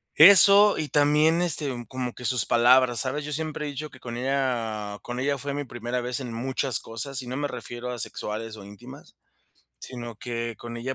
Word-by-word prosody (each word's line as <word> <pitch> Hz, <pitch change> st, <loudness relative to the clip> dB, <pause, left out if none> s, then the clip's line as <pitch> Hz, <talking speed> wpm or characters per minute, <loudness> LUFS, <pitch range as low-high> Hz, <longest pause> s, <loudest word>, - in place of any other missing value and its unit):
eso 200 Hz, +4 st, +8 dB
y 155 Hz, -2 st, -3 dB
también, 150 Hz, +3 st, +3 dB
este, 155 Hz, -4 st, +4 dB, 0.2 s
como 125 Hz, -1 st, -5 dB
que 125 Hz, -, -10 dB
sus 125 Hz, -2 st, 0 dB
palabras, 120 Hz, 0 st, +4 dB
¿sabes? 140 Hz, +3 st, -1 dB
Yo 150 Hz, -, -6 dB
siempre 155 Hz, 0 st, -4 dB
he -, -, -4 dB
dicho 150 Hz, +2 st, -6 dB
que 130 Hz, -, -17 dB
con 120 Hz, -1 st, -7 dB
ella 115 Hz, -6 st, -2 dB
con 120 Hz, +1 st, -6 dB
ella 140 Hz, 0 st, 0 dB
fue 140 Hz, +2 st, -5 dB
mi 145 Hz, 0 st, -3 dB
primera 120 Hz, 0 st, -4 dB
vez 125 Hz, 0 st, -4 dB
en 125 Hz, -4 st, -6 dB
muchas 130 Hz, +2 st, -2 dB
cosas, 130 Hz, +5 st, -3 dB
y 125 Hz, -, -10 dB
no 130 Hz, +2 st, -4 dB
me 145 Hz, -, -1 dB
refiero 120 Hz, -1 st, -7 dB
a 125 Hz, -, -6 dB
sexuales 110 Hz, +1 st, -4 dB
o 100 Hz, -, -11 dB
íntimas, 100 Hz, 0 st, -13 dB, 0.6 s
sino 120 Hz, -, -7 dB
que 115 Hz, -1 st, -5 dB
con 120 Hz, 0 st, -8 dB
ella, 130 Hz, +3 st, -4 dB
125 Hz, 205 wpm, -25 LUFS, 120-145 Hz, 0.6 s, eso